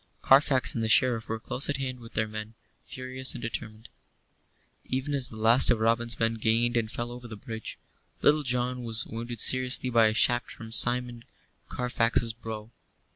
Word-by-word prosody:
Carfax 135 -1 +4
and 115 - -2
the 110 - -1
Sheriff 115 -1 +2
were 110 0 -3
close 125 +5 -3
at 145 - -1
hand 130 -2 -4
with 115 -1 -14
their 110 0 0
men, 110 +1 -7 0.3
furious 130 0 -5
and - - -7
determined. 110 -1 -5 1.0
Even 135 +3 -3
as 135 -3 +2
the 110 - -9
last 115 +4 +5
of 115 - +2
Robin's 115 +1 0
men 115 0 +1
gained 115 +2 +1
and 115 -2 0
fell 120 0 -4
over 120 0 -9
the 110 - -9
bridge, 110 +2 -8 0.5
Little 150 +1 +4
John 125 -1 -2
was 115 -2 -1
wounded 115 +1 -7
seriously 130 0 +3
by 115 -2 +5
a 110 - -1
shaft 120 +2 +2
from 115 -1 -10
Simeon 120 0 +2 0.5
Carfax's 120 -2 0
bow. 110 -1 -8
120 Hz, 180 wpm, -27 LUFS, 110-125 Hz, 1.0 s, last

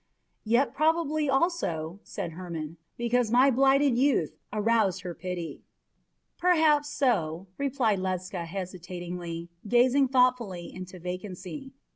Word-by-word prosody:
"Yet 240 +6 +2
probably 310 0 +1
also," 205 - 0
said 165 - -5
Hermon, 165 -2 -6 0.2
"because 240 -1 +1
my 255 +4 +5
blighted 270 0 +4
youth 265 - +2 0.2
aroused 210 -3 +2
her 180 -2 -5
pity." 175 -1 -5 0.8
"Perhaps 315 -4 +4
so," 195 - 0
replied 255 -7 +1
Ledscha 185 -1 -3
hesitatingly, 175 -1 -6 0.2
gazing 255 +4 +4
thoughtfully 250 -9 +1
into 185 0 -8
vacancy. 185 - -7
215 Hz, 105 wpm, -28 LUFS, 180-270 Hz, 0.8 s, my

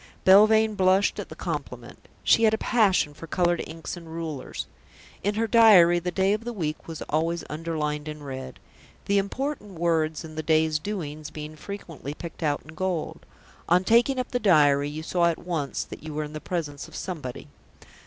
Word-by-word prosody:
Belvane 215 +3 +6
blushed 190 0 +3
at - - -6
the - - -9
compliment. - - -6 0.2
She - - +5
had 220 0 +4
a - - -5
passion 200 -11 +2
for 165 - -10
coloured 175 +1 +1
inks 160 +3 -6
and 170 -2 -11
rulers. 160 -4 -5 0.6
In 205 +2 0
her 225 +1 +1
diary 200 -7 +7
the 180 +1 -3
day 190 +3 +2
of 215 +2 -2
the 240 0 -4
week 155 -7 -4
was 165 -2 -6
always 165 +2 -1
underlined 150 -1 -3
in 150 -1 -7
red, 130 -2 -7 0.5
the 200 0 +3
important 210 +1 -4
words 160 -2 0
in 160 -1 -9
the 155 - -3
day's 155 -1 +2
doings 155 -6 -5
being 155 0 -8
frequently 165 -5 -7
picked 170 +1 -9
out 145 -2 0
in 155 - -13
gold. 180 -2 -3 0.4
On 180 +2 +4
taking 235 +6 +4
up 255 - -2
the 245 - 0
diary 145 -8 +4
you 155 +2 -6
saw 175 +1 +1
at 165 - -2
once 165 -6 -3
that - - -10
you 155 -1 -7
were 155 - -1
in 150 0 -8
the 155 - -6
presence 150 -5 -4
of - - -14
somebody. 150 -7 -6
165 Hz, 190 wpm, -26 LUFS, 155-195 Hz, 0.6 s, diary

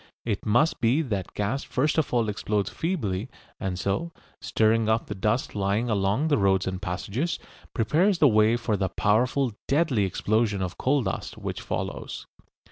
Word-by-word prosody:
It 110 -2 -2
must 120 +9 +2
be 125 +7 +3
that 100 - -2
the - - -19
gas 110 +7 -1
first 145 +4 +1
of 155 - -1
all 120 -3 +2
explodes 105 0 -1
feebly, 125 - -2 0.3
and 95 -1 -2
so, 100 - -1 0.3
stirring 110 0 +2
up 110 +1 +2
the - - -5
dust 105 +6 -1
lying 105 +4 0
along 100 +8 +1
the 145 -6 +2
roads 95 -1 +3
and 95 0 -3
passages, 105 - -2 0.4
prepares 160 - +2
the 150 - +6
way 110 0 +4
for 115 -2 -1
the 95 -1 -1
powerful, 120 +7 +1 0.2
deadly 140 -7 +2
explosion 105 +1 0
of 90 -1 -4
coal 135 0 +2
dust - - -4
which - - -5
follows. - - -4
110 Hz, 170 wpm, -26 LUFS, 100-130 Hz, 0.4 s, the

